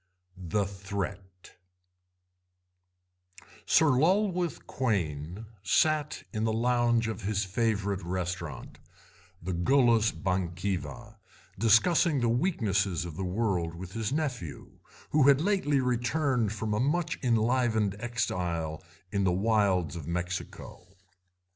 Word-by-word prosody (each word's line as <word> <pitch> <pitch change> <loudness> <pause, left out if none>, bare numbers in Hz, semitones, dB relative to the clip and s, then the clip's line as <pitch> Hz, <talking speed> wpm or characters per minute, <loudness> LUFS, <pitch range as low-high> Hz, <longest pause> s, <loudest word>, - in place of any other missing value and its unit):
THE 95 +2 -1
THREAT 95 -1 -6 2.2
Sir 160 -2 +5
Lulworth 180 +5 +1
Quayne 90 - -2 0.2
sat 150 - +1
in 110 -1 -1
the 110 - +1
lounge 120 0 +2
of 110 0 -4
his 105 +1 -1
favourite 100 -1 -1
restaurant, 85 -5 -5 0.6
the 95 +1 -3
Gallus 115 +4 +3
Bankiva, 95 +5 -3 0.4
discussing 140 - +4
the 120 -1 +1
weaknesses 105 - 0
of 85 -3 -7
the 95 - -4
world 90 -4 -1
with 90 +1 -8
his 115 0 -2
nephew, 130 - -4 0.3
who 150 -2 +4
had 140 -1 +6
lately 165 -6 +1
returned 125 -1 0
from 110 0 -3
a 105 - 0
much 160 +6 0
enlivened 115 -3 +1
exile 90 -9 -2 0.3
in 100 -1 0
the 95 - +3
wilds 95 -4 +1
of 80 -3 -7
Mexico. 90 +1 -5
105 Hz, 110 wpm, -29 LUFS, 90-125 Hz, 2.2 s, had